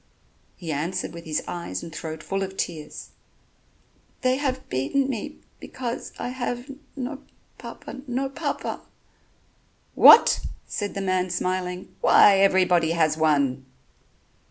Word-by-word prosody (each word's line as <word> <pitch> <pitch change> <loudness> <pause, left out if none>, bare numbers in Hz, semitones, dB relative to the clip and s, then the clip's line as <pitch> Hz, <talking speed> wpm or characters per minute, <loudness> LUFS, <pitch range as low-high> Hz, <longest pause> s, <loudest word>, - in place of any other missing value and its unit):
He 170 -3 -6
answered 165 +7 -3
with 170 0 -10
his 155 -1 -2
eyes 170 - -5
and 165 - -9
throat 160 -1 -6
full 195 0 -2
of 190 0 -5
tears: 155 -3 -5 1.1
"They 255 -1 +2
have 265 -2 -2
beaten 135 - 0
me... 275 +4 -5 0.2
because... 245 -2 -5
I... - - -4
have 245 +1 -4 0.2
no... 265 +1 -5 0.4
Papa... 265 - -9
no 260 +2 -1
Papa." 270 - -4 1.1
"What!" - - +8 0.2
said 205 -1 -4
the 195 - -2
man 185 -1 0
smiling, 180 0 -3
"why 195 -1 +6
everybody 180 -4 +3
has 160 -2 +2
one." 140 -4 +1
185 Hz, 125 wpm, -24 LUFS, 160-245 Hz, 1.1 s, What